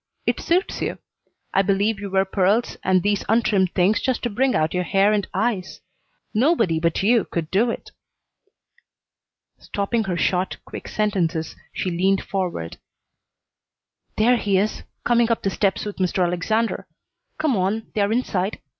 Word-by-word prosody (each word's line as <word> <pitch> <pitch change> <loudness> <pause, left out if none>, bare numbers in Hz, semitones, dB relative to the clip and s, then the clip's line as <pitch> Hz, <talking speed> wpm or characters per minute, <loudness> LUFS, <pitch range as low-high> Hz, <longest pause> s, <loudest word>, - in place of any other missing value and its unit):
It - - +1
suits 360 +3 0
you. - - -2 0.6
I 195 - +4
believe 200 +2 +1
you 200 0 -5
wear 190 0 +2
pearls 195 +4 +1
and 185 -1 +3
these 205 -1 +1
untrimmed 205 -5 +2
things 190 +4 +3
just 260 -3 -1
to 240 - -1
bring 260 +5 +1
out 155 +1 +1
your 180 - +1
hair 195 +3 +3
and 205 -2 0
eyes. 215 -6 -1 0.5
Nobody 225 - +2
but 165 +2 0
you 230 +2 +4
could 165 -2 -4
do 220 +5 +3
it." - - -5 1.7
Stopping 215 +3 -1
her 180 -2 -2
short, 180 +1 0
quick - - -8
sentences, 175 -7 -1 0.2
she 185 - -2
leaned 190 +3 +1
forward. 180 - -3 1.4
"There 240 +3 +4
he 200 -4 +1
is, 205 +3 0 0.2
coming 235 -1 +3
up 230 - 0
the 195 - 0
steps 195 0 0
with 205 - -5
Mr. 185 0 +1
Alexander. 215 +6 -1 0.5
Come 310 -5 +1
on; 200 +4 -1
they're 205 -1 +1
inside. 210 -5 -1
200 Hz, 155 wpm, -22 LUFS, 185-225 Hz, 1.7 s, I